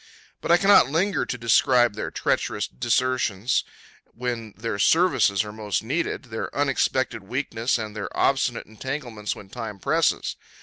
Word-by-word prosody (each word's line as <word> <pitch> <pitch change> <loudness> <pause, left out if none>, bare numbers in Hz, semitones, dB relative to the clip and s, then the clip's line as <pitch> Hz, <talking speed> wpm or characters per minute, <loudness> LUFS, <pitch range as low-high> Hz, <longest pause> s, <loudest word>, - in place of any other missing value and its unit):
But - - -1
I 170 - +7
cannot 195 -5 +6
linger 175 +4 0
to 125 - -3
describe 120 0 +4
their 110 - -4
treacherous - - -1
desertions 120 - 0 0.4
when 115 -3 -5
their 110 -2 -3
services 160 - +3
are 105 - -7
most 105 -1 -2
needed, 155 +10 -2
their 110 - -3
unexpected 130 -4 0
weakness, 120 +2 -1
and 110 -2 -6
their 100 -3 -4
obstinate - - +1
entanglements 115 -2 -5
when 95 - -12
time 110 -2 -6
presses. 155 +8 0
120 Hz, 140 wpm, -24 LUFS, 105-135 Hz, 0.4 s, I